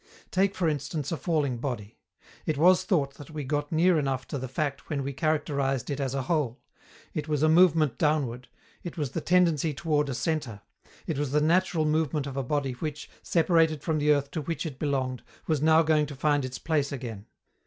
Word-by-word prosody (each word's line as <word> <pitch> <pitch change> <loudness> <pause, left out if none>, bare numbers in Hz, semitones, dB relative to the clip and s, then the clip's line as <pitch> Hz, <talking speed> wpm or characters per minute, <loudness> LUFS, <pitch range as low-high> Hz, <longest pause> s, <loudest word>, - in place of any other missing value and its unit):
Take, 195 +1 +2
for 185 -2 0
instance, 145 0 -2
a - - 0
falling 150 -7 -1
body. 115 -5 -5 0.5
It 155 - 0
was 180 +4 +5
thought 145 -8 +1
that 145 - -11
we 155 -2 -5
got 145 +2 -2
near 170 +1 +4
enough 135 -3 -2
to 140 - -3
the 130 - -4
fact 140 +2 -3
when 145 -3 -1
we 140 +1 -3
characterized 140 -3 0
it 140 - -3
as 135 -1 -2
a 135 - -1
whole: 135 -5 -1 0.5
it 150 0 -3
was 150 -1 0
a - - +5
movement 160 -5 +4
downward; 135 -5 0 0.3
it 175 - -7
was 145 -5 -2
the - - -3
tendency 165 -4 +2
toward 150 -1 0
a 130 - -2
centre; 130 -9 -2 0.4
it 150 -4 -2
was 145 -3 -1
the 150 - +4
natural 165 +1 +2
movement 150 -2 0
of 140 -2 -6
a 135 - 0
body 135 +1 -1
which, 150 +4 -6
separated 165 -3 +2
from 160 -2 0
the 150 0 +3
earth 140 -1 +1
to 160 - -3
which 165 +4 -3
it 140 -4 -6
belonged, 130 -4 -1 0.2
was 155 -4 0
now 160 +1 +5
going 155 -1 +2
to 145 - -8
find 145 -1 +1
its 130 0 -5
place 150 -3 0
again. 115 -7 -6
150 Hz, 205 wpm, -27 LUFS, 135-160 Hz, 0.5 s, was